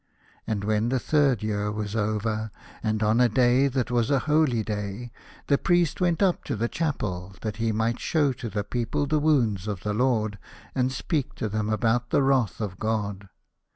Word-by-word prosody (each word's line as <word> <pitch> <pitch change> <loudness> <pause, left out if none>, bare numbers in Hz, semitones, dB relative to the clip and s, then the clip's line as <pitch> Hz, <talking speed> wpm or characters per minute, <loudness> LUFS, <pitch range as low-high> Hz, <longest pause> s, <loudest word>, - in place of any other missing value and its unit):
And 105 -3 -1
when 110 +2 +1
the 130 - +1
third 140 -6 +2
year 105 -1 -1
was 105 0 -4
over, 110 0 -1 0.3
and 110 -1 0
on 110 +3 +3
a 125 - +5
day 125 +3 +4
that 130 -3 -1
was 120 -2 +1
a 140 - +3
holy 150 -7 +2
day, 105 +3 -4 0.3
the 140 - +2
Priest 175 0 +2
went 175 +1 +2
up 185 -3 +2
to - - -2
the 115 +2 0
chapel, 100 - -3
that 110 -1 -4
he 115 0 0
might 110 +2 0
show 145 -5 +1
to 120 -2 -6
the 105 0 -2
people 125 +6 -1
the 150 +2 +1
wounds 120 -11 +2
of 100 -4 -4
the 105 - -1
Lord, 110 -3 +1 0.3
and 130 0 +1
speak 140 +2 -2
to 110 - -2
them 110 0 -2
about 115 +2 +1
the 140 - +3
wrath 130 -6 +2
of 100 -4 -4
God. 100 -3 -2
115 Hz, 190 wpm, -26 LUFS, 105-135 Hz, 0.3 s, a